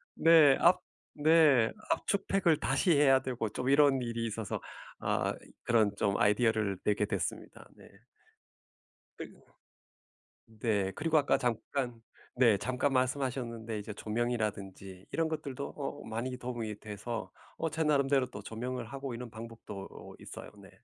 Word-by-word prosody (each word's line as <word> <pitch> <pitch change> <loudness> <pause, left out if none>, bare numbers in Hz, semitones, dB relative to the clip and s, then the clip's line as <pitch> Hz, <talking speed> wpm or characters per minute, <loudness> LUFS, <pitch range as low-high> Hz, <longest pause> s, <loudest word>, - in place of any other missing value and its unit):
네 160 -5 +6
압 180 +1 +5 0.4
네 150 -6 +5 0.2
압축팩을 195 -5 +1
다시 135 +7 +1
해야 135 -2 +5
되고 125 -4 -3
좀 125 +5 -3
이런 140 -1 +5
일이 115 -1 -3
있어서 110 -2 -3 0.4
아 - - 0 0.3
그런 110 -4 +2
좀 100 0 0
아이디어를 105 -2 +2
내게 105 0 +1
됐습니다. 100 -4 -4
네. - - -15 1.3
그리고 - - -10 1.2
네. 100 -4 +1
그리고 160 0 +1
아까 145 - +3
잠깐 120 0 -2 0.3
네 120 -5 +5
잠깐 130 +5 -1
말씀하셨는데 125 -4 -1
이제 105 +1 -7
조명이라든지 105 -5 -3
이런 165 -1 0
것들도 145 -4 -5
어 145 0 -5
많이 120 +3 -4
도움이 115 -4 -5
돼서 110 +2 -6 0.3
어 165 - -1
제 160 +1 -1
나름대로 140 -3 +2
또 100 - -8
조명을 120 +3 -5
하고 135 +2 -6
이런 120 0 -7
방법도 110 -3 -9
어 - - -11
있어요. - - -9
네. - - -14
120 Hz, 290 characters per minute, -31 LUFS, 110-140 Hz, 1.3 s, 네